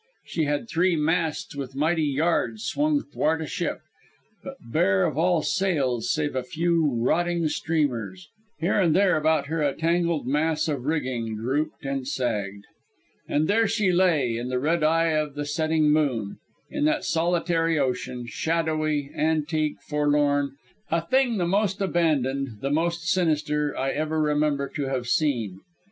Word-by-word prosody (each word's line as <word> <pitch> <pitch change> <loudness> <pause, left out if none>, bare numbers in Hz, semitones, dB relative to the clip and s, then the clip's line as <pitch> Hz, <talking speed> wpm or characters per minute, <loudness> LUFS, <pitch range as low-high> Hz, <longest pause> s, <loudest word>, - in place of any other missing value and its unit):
She 160 - -1
had 145 +9 -1
three 180 -1 +2
masts 160 -1 -1
with 135 -2 -6
mighty 160 +4 +1
yards 140 -6 0
swung 295 - +1
'thwart 155 +2 -1
ship, - - -3 0.6
but - - -7 0.2
bare 95 -3 +3
of - - -1
all 165 0 +2
sails 140 - 0
save 150 -2 -1
a 130 - 0
few 160 +1 0
rotting 170 +7 +1
streamers. 120 - -2 0.3
Here 175 +5 +1
and 165 -4 +3
there 195 -1 +4
about 155 -2 +2
her 160 +2 -2
a 145 -2 +1
tangled 170 -2 0
mass 155 +4 0
of 140 -5 -3
rigging 130 -7 -2
drooped 135 +7 -2
and 135 -1 -3
sagged. 100 -7 -2 0.6
And 150 +2 +1
there 225 +2 +3
she 210 -4 +1
lay, 160 -10 +2
in 120 +2 -4
the 130 - -1
red 155 +5 +1
eye 165 +1 +3
of 155 -2 -1
the 145 0 -3
setting 155 0 +1
moon, 130 -10 0 0.3
in 295 0 0
that 310 0 +1
solitary 165 -1 +1
ocean, 125 -2 -2
shadowy, 155 0 -1
antique, 155 0 0
forlorn, 145 -1 +1 0.3
a 165 0 0
thing 260 0 +2
the 175 - 0
most 200 +2 +1
abandoned, 140 - 0
the 135 - -1
most 170 +2 0
sinister 150 -4 0
I 135 +1 0
ever 155 +2 -1
remember 150 -2 +1
to 145 -3 -3
have 130 -2 -2
seen. 120 - 0
155 Hz, 155 wpm, -25 LUFS, 135-165 Hz, 0.6 s, there